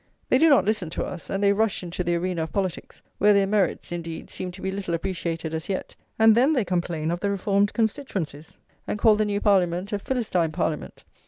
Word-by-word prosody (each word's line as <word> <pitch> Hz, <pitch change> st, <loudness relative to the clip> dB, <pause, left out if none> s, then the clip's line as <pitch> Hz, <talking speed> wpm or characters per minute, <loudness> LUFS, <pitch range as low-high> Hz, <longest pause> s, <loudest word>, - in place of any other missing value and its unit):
They 255 Hz, -, +4 dB
do 325 Hz, -, +6 dB
not 280 Hz, -, +5 dB
listen 210 Hz, -5 st, 0 dB
[lviii] -, -, -10 dB
to -, -, -2 dB
us, 180 Hz, -, -8 dB
and 195 Hz, +1 st, -1 dB
they 200 Hz, 0 st, +5 dB
rush 215 Hz, -2 st, 0 dB
into 175 Hz, +1 st, -3 dB
the 175 Hz, 0 st, 0 dB
arena 175 Hz, 0 st, -1 dB
of 160 Hz, -, -4 dB
politics, 190 Hz, -4 st, -4 dB, 0.2 s
where 210 Hz, 0 st, +6 dB
their 200 Hz, 0 st, +4 dB
merits, 195 Hz, -4 st, 0 dB
indeed, 165 Hz, -1 st, -6 dB
seem 185 Hz, -, -5 dB
to 185 Hz, -, -11 dB
be 190 Hz, -, -1 dB
little 190 Hz, -3 st, -2 dB
appreciated 170 Hz, -2 st, -3 dB
as 160 Hz, +2 st, -4 dB
yet; 190 Hz, -, -3 dB, 0.2 s
and 220 Hz, 0 st, +7 dB
then 260 Hz, +7 st, +4 dB
they 250 Hz, -8 st, +1 dB
complain 170 Hz, -3 st, -1 dB
of 175 Hz, -, -2 dB
the 200 Hz, -, -1 dB
reformed 200 Hz, 0 st, +1 dB
constituencies, 195 Hz, -, -3 dB, 0.3 s
and -, -, -2 dB
call 215 Hz, 0 st, +5 dB
the 215 Hz, 0 st, +1 dB
new 205 Hz, -1 st, -1 dB
Parliament 190 Hz, -1 st, +1 dB
a 205 Hz, -, 0 dB
Philistine 200 Hz, -9 st, -1 dB
Parliament. 160 Hz, -2 st, -3 dB
190 Hz, 225 wpm, -25 LUFS, 170-210 Hz, 0.3 s, and